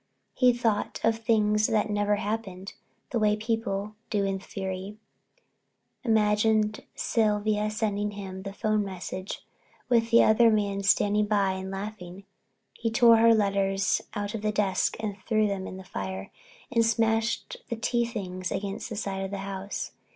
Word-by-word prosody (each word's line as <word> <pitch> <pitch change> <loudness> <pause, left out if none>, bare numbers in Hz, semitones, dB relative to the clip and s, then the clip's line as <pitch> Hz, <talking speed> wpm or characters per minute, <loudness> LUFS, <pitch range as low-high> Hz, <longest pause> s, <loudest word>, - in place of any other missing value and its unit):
He 250 -1 +5
thought 230 -3 -1
of 225 0 +2
things 215 -2 +2
that 215 -1 +1
never 205 0 +2
happened, 205 -2 -4 0.4
the 235 - 0
way 210 -1 +3
people 215 -2 -2 0.2
do 205 -3 +1
in 195 0 -1
a - - -9
fury—imagined 210 - -2 0.2
Sylvia 210 -1 +1
sending 210 -1 -1
him 195 -2 -7
the 195 0 -6
phone 215 +1 0
message 185 0 -6 0.4
with 230 -2 +3
the 235 - +6
other 230 +2 +5
man 200 -2 +1
standing 205 +1 +3
by 200 -2 +2
and 190 0 -5
laughing. 195 -1 -7 0.5
He 230 - -2
tore 230 0 +6
her 230 0 +6
letters 195 -2 +1
out 205 0 -3
of 225 - -4
the 215 0 0
desk 205 -2 +1
and 210 -2 -3
threw 215 -2 +3
them 195 -2 -2
in 185 - -7
the 190 - -9
fire 95 - -5 0.4
and 230 -2 +3
smashed 225 - +1
the 235 - -1
tea 235 +1 0
things 185 -6 -5
against 200 +3 -4
the 225 - -5
side 195 -2 -3
of 195 - -3
the 200 - -4
house. 195 0 -5
210 Hz, 160 wpm, -27 LUFS, 195-225 Hz, 0.5 s, the